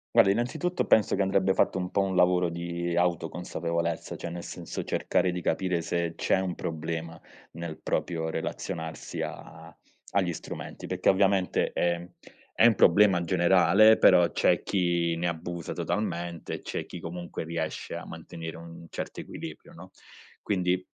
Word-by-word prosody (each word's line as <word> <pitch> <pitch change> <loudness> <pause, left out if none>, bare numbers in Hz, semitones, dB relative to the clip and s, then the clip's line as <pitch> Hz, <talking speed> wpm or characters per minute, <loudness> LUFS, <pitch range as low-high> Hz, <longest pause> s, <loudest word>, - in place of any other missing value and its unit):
Guarda, 95 - +7
innanzitutto, 125 - -1
penso 110 - +4
che 100 - 0
andrebbe 95 0 +2
fatto - - +2
un 90 -1 -2
po' 100 - +1
un 95 -1 -1
lavoro 90 -1 +4
di 85 0 -3
autoconsapevolezza, 85 -1 -1
cioè, - - -5
nel 85 0 -6
senso, - - -6
cercare 90 - +1
di 90 - -3
capire 90 -1 0
se 85 0 -2
c'è - - +2
un 95 -2 -2
problema, 80 0 -4 0.3
nel 85 -1 -7
proprio 80 -2 -1
relazionarsi 80 0 -4
a - - -8 0.4
agli 90 -4 +1
strumenti, - - -7
perché - - +1
ovviamente 95 -1 +2
è 85 0 0 0.5
è - - +4
un 115 - +4
problema 95 -1 +5
generale, 95 +4 +5
però 90 -2 +6
c'è - - +3
chi 85 -3 +1
ne 85 +1 -1
abusa 85 0 -5
totalmente, 85 -5 -3
c'è - - -4
chi 90 - -8
comunque 85 0 -6
riesce 80 -1 -4
a - - -6
mantenere 80 -1 -8
un 85 0 -11
certo - - -5
equilibrio, - - -9
no? 90 +3 -12 0.5
Quindi, 90 -2 0
85 Hz, 150 wpm, -28 LUFS, 85-95 Hz, 0.5 s, Guarda